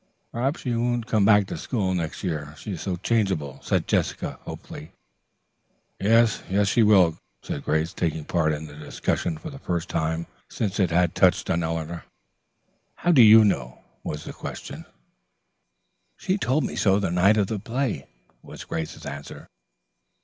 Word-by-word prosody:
"Perhaps 135 +6 -1
she 125 -3 -1
won't 120 0 0
come 110 -3 +2
back 105 -1 +5
to - - -6
school 100 -7 -1
next 85 -3 -3
year, 75 -5 -3
she 105 - -7
is 90 - -5
so 95 -2 -2
changeable," 90 - -1
said - - 0
Jessica - - -1
hopefully. 75 - -9 1.1
"Yes, 115 +2 +3 0.2
she 100 +4 +2
will," 95 -7 +5 0.2
said - - -5
Grace, 80 +2 0
taking 80 -3 -2
part 80 -3 +1
in 75 +1 -4
the 75 - -11
discussion 75 +2 -2
for 150 - -8
the 135 - -10
first 85 -3 -3
time 80 +1 -1 0.2
since 105 -2 -3
it 95 -3 +3
had 85 +1 +2
touched 95 0 +3
on 85 -1 +1
Eleanor. 80 0 -4 0.9
"How 175 - +1
do 145 -7 +7
you 110 0 +9
know?" 65 -11 -1 0.2
was 75 0 -5
the - - -8
question. - - -8 1.3
"She 185 - -1
told 150 -6 +1
me - - -3
so 100 -1 +3
the 95 - -1
night 95 +5 +4
of 105 - +3
the 105 +1 -3
play," 115 - -2 0.3
was - - -10
Grace's 80 -1 -5
answer. 70 0 -8
95 Hz, 165 wpm, -25 LUFS, 80-110 Hz, 1.3 s, you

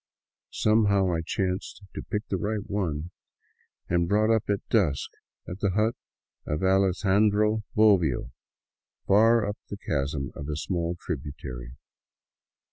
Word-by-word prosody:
Some 110 0 +2
how 100 -3 +2
I 80 - 0
chanced 95 +4 -3
to - - -5
pick 105 0 -4
the 95 - -1
right 105 +2 -3
one 85 -5 -2 0.8
and 85 0 +1
brought 110 +2 +3
up 110 - -2
at 100 -1 -1
dusk 90 - +1 0.4
at 90 +2 -6
the 100 -3 0
hut 110 +2 +2 0.5
of 75 +4 -2
Alexandro 100 +3 +3
Bobbio, 90 - +3 0.7
far 115 +2 +5
up 105 - -4
the 100 - -5
chasm 70 -5 -2
of 70 - -7
a 75 - -2
small 85 +3 -2
tributary. 65 -6 -6
95 Hz, 130 wpm, -27 LUFS, 80-105 Hz, 0.8 s, far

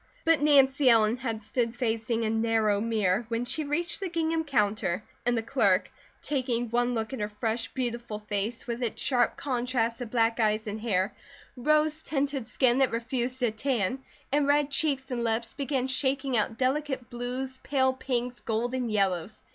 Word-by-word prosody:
But 325 -3 +4
Nancy 275 -2 +5
Ellen 225 0 +4
had 230 -4 -4
stood 230 +1 -1
facing 230 -1 -1
a - - +1
narrow 220 -2 +2
mirror 215 -2 +1
when 230 +1 -1
she 310 +5 -2
reached 300 +4 -1
the 390 -2 -3
gingham 325 -1 0
counter 210 - 0 0.2
and 240 -1 +3
the 225 - -1
clerk, 220 -7 +2 0.3
taking 245 -5 -1
one 245 +1 +1
look 220 +2 -3
at 265 - -4
her 210 0 -2
fresh, 225 +2 -2
beautiful 235 -4 -3
face 210 +2 -3
with 240 0 -4
its 235 -3 -2
sharp 245 -3 +1
contrasts 245 -3 -1
of 240 - -4
black 230 0 +1
eyes 215 -1 +2
and 210 0 -5
hair, 195 -3 0 0.4
rose 305 +4 +2
tinted 275 -5 -2
skin 250 0 +3
that 265 -2 +4
refused 245 +2 -2
to 240 -3 +2
tan, 250 +1 -1 0.3
and 285 0 +2
red 290 0 +3
cheeks 275 -2 +1
and 240 -1 -1
lips, 230 0 -1
began 275 -2 -1
shaking 265 0 0
out 225 0 +1
delicate 265 -1 -1
blues, 255 +2 -4
pale 260 -2 +1
pinks, 250 -2 -3
golden 240 +2 -1
yellows. 195 -2 -1
245 Hz, 170 wpm, -28 LUFS, 225-265 Hz, 0.4 s, Nancy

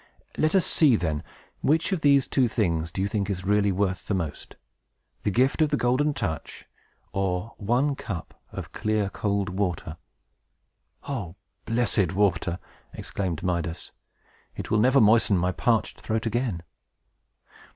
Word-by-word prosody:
"Let 155 +4 +2
us 190 - +5
see, 145 -7 +4
then. 80 -7 -1 0.4
Which 160 +5 +2
of 185 -4 0
these 140 -2 +5
two 130 -3 +2
things 85 -8 0
do 95 - -2
you - - +1
think 100 -1 -2
is 95 -2 -3
really 100 0 +3
worth 95 0 -1
the 100 - 0
most, 80 -6 -5 0.7
the - - 0
gift 130 - +2
of 155 - +4
the 145 - +1
Golden 140 +4 +1
Touch, 80 - -4 0.5
or 95 +3 -1
one 125 +7 +1
cup 95 -10 -6 0.2
of - - -7
clear 105 -2 -1
cold 100 -1 -1
water?" 90 -4 -2 1.1
"O 105 -12 -4 0.3
blessed 115 -6 +1
water!" 90 -3 +1 0.4
exclaimed 90 -5 -3
Midas. 85 -2 -2 0.6
"It - - -6
will 105 - +4
never 130 +5 +5
moisten 110 -3 +5
my 90 +1 +1
parched 110 +7 0
throat 110 +1 -2
again!" 115 -6 -1
100 Hz, 145 wpm, -26 LUFS, 90-120 Hz, 1.1 s, us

